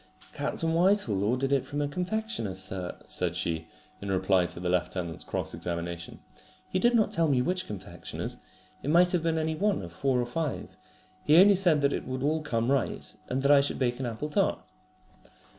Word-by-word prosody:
"Captain 165 0 -1
Whitehall 170 - +2
ordered 130 +6 +1
it 135 - +2
from 145 - -5
a 145 - 0
confectioner's, 180 - -2
sir," 95 -1 -2
said - - -1
she, 80 -1 -2 0.3
in 100 - -5
reply 95 -1 +2
to - - -7
the 90 - -3
lieutenant's 90 -2 -1
cross - - -3
examination. 85 -1 -5 0.5
"He 185 - -1
did 240 +4 +3
not 220 -2 +3
tell 165 -1 +2
me 135 -4 +3
which 180 +3 -1
confectioner's. 95 -4 -6 0.4
It 140 - -3
might 175 +3 +5
have 180 - +1
been 165 0 0
any 160 0 0
one 200 - 0
of 85 -1 -9
four 130 +6 +1
or 120 - 0
five. 150 +3 -4 0.5
He 150 - +5
only 200 +3 +8
said 175 -6 +3
that 140 0 +2
it - - -4
would 130 0 -3
all 155 +2 +1
come 120 -4 0
right, 140 -2 -1
and 130 +1 -2
that 140 - +4
I 140 -1 +7
should 140 - -1
bake 120 -1 0
an 130 - -2
apple 120 +6 -4
tart." 195 +5 +1
135 Hz, 195 wpm, -28 LUFS, -, 0.5 s, only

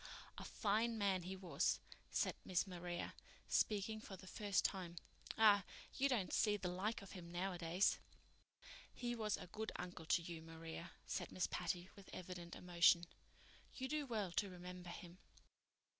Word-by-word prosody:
"A - - -5
fine 225 +2 +2
man 195 -3 +3
he 185 +2 -4
was," 185 -1 +1 0.3
said - - +1
Miss 180 0 +2
Maria, 175 -2 -3 0.3
speaking 215 +1 +2
for 195 -3 -7
the 185 - -12
first 200 0 +1
time. 180 -3 -1 0.4
"Ah, 205 -3 +8 0.3
you 275 +1 +3
don't 220 -8 +1
see 210 -1 +4
the 185 -3 -2
like 200 +4 -1
of 195 - -10
him 170 -2 -7
nowadays." 175 0 +2 0.9
"He 240 -1 -2
was 215 -3 +1
a - - -7
good 215 +5 -3
uncle 175 -3 -5
to 170 - +4
you, 165 -1 -5
Maria," 165 +1 -7
said - - -2
Miss 185 - +1
Patty, 175 +1 -1
with 200 -2 -13
evident 175 -1 -6
emotion. 175 -1 +6 0.7
"You 260 - -2
do 295 0 0
well 210 -7 0
to 200 +3 +1
remember 180 0 -7
him." 175 0 -8
185 Hz, 160 wpm, -42 LUFS, 175-210 Hz, 0.9 s, Ah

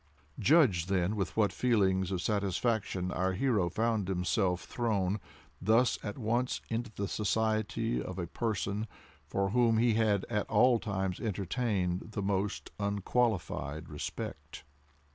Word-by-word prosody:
Judge, 125 - +4
then, 95 +1 +1
with 100 0 -3
what 105 -4 +3
feelings 95 -6 +2
of 90 -2 -2
satisfaction 100 -2 0
our 95 0 0
hero 105 -5 +1
found 110 0 0
himself 90 0 0
thrown 105 -4 0 0.4
thus 115 +3 +3
at 105 - -5
once 120 +2 0
into 115 0 -2
the 100 - -2
society 110 +2 0
of 95 - -6
a 90 - -2
person 105 +2 -2 0.4
for 100 0 0
whom 115 -1 +3
he 115 0 +4
had 105 -3 +2
at 105 -3 -2
all 125 -2 +5
times 95 -4 -2
entertained 100 -2 -1
the 100 - -2
most 100 +1 -1
unqualified 100 - -1
respect. 75 -1 -6
105 Hz, 130 wpm, -31 LUFS, 95-115 Hz, 0.4 s, all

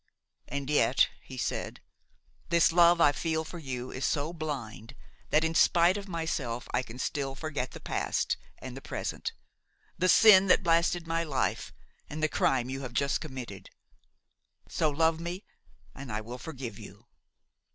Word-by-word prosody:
"And 140 -1 -4
yet," 150 0 +3
he - - -11
said, - - -3 0.7
"this 170 0 +4
love 170 0 +6
I 150 -3 +6
feel 160 +2 -1
for 170 +2 -8
you 130 -4 -5
is 130 - -5
so 150 +3 0
blind 135 -6 -6 0.3
that, 155 - +3
in 160 0 0
spite 170 +2 +4
of 205 -1 -5
myself, 160 -9 -3
I 125 - +2
can 125 -1 -10
still 135 0 -2
forget 145 -4 -3
the - - -10
past - - -1 0.2
and 130 -1 -8
the 135 - -8
present–the 185 +6 -5
sin 195 -3 +8
that 190 - +4
blasted 170 0 +2
my 165 0 0
life 140 -5 -1 0.4
and 155 +1 -5
the - - +5
crime 130 -4 +1
you 135 +1 -4
have 125 -3 -6
just 140 +2 0
committed. 130 - -8 1.0
So 155 - 0
love 160 +2 +2
me, 175 +4 -5 0.5
and 135 -3 -8
I 105 - -2
will 120 +3 -8
forgive 125 -6 -7
you." - - -13
150 Hz, 160 wpm, -29 LUFS, 130-165 Hz, 1.0 s, sin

